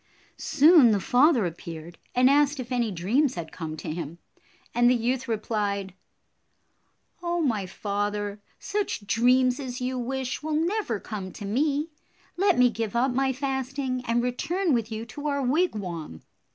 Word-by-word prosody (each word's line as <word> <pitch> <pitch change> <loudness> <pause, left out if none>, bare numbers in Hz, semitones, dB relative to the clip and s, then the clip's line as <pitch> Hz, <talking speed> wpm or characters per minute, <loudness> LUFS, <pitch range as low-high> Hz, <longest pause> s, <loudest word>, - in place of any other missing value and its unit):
Soon 310 -3 +6
the 205 - +1
father 250 - +4
appeared 170 0 -7 0.2
and 250 +1 +5
asked 285 +1 +3
if 250 0 -6
any 240 -3 +1
dreams 225 - +1
had 165 -2 -6
come 160 -3 -6
to 150 - -5
him, 165 -1 -6 0.6
and 240 +1 +4
the 250 - +4
youth 250 +3 -1
replied, 205 -4 -2 1.3
"Oh, 345 0 -1
my 225 - 0
father, 205 +1 -3 0.2
such 400 - -3
dreams 250 +5 +3
as 250 -3 -5
you 255 0 -2
wish 260 +1 -3
will 310 0 -2
never 330 - 0
come 195 -3 -6
to 205 - -8
me. 290 +8 0 0.4
Let 385 0 +3
me 250 -1 +5
give 225 -1 -4
up 250 +3 +2
my 265 +1 +2
fasting 265 -1 -2
and 235 +1 +1
return 325 +8 0
with 230 -2 0
you 220 +1 -4
to 290 +5 -6
our 280 -1 0
wigwam." 200 - -1
245 Hz, 155 wpm, -26 LUFS, 205-280 Hz, 1.3 s, Soon